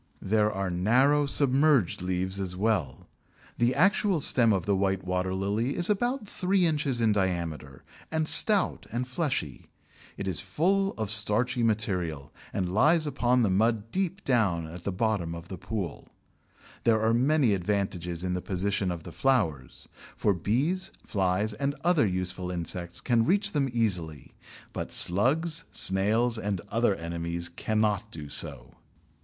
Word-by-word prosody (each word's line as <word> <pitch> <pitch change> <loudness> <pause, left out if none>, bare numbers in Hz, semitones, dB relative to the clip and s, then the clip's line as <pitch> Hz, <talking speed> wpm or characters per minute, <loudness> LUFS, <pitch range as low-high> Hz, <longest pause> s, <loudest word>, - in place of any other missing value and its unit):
There 105 +1 +2
are 95 -2 -3
narrow 130 +11 +3
submerged 140 - +2
leaves 95 +1 -2
as 90 -2 -3
well. 95 - -1 0.5
The 120 +2 +2
actual 195 +2 +3
stem 120 -5 +4
of 95 -5 0
the 100 - +1
White 95 0 0
Water 90 0 -2
lily 105 +7 -1
is 175 +3 +3
about 240 +2 -1
three 185 -1 +1
inches 145 -6 +1
in 115 -2 +3
diameter, 85 -8 -2 0.3
and 160 -1 -1
stout 205 +1 +1
and 125 +2 -3
fleshy. 130 - -3 0.5
It 100 - -4
is 90 -4 0
full 190 - 0
of 110 -2 -3
starchy 110 +4 +1
material, 90 -10 -1 0.2
and 90 -1 -2
lies 155 - +4
upon 125 -4 +1
the 100 - +1
mud 110 +2 +1
deep 190 0 -2
down 100 -10 +1
at 85 +2 -10
the 100 - -1
bottom 95 -4 -1
of 85 +1 -10
the 95 - -6
pond. 95 -3 -5 0.7
There 115 -2 +3
are 110 +1 +2
many 130 -1 +3
advantages 90 -3 -2
in 90 -1 -1
the 90 - -2
position 100 +1 -1
of 85 -3 -5
the - - -9
flowers, 90 - -1 0.3
for 105 - +2
bees, 145 - -1
flies, 100 +2 0
and 140 +6 -2
other 170 -9 +3
useful 90 -1 -3
insects 85 0 -2
can 120 -3 +2
reach 200 - +1
them 140 -3 0
easily, 90 - -2 0.4
but - - -5
slugs, 155 - +3
snails, 110 +5 +2
and 100 -3 -2
other 115 -3 +1
enemies 85 0 -3
cannot 105 +3 -1
do 75 -3 -9
so. - - -5
105 Hz, 150 wpm, -27 LUFS, 90-135 Hz, 0.7 s, stem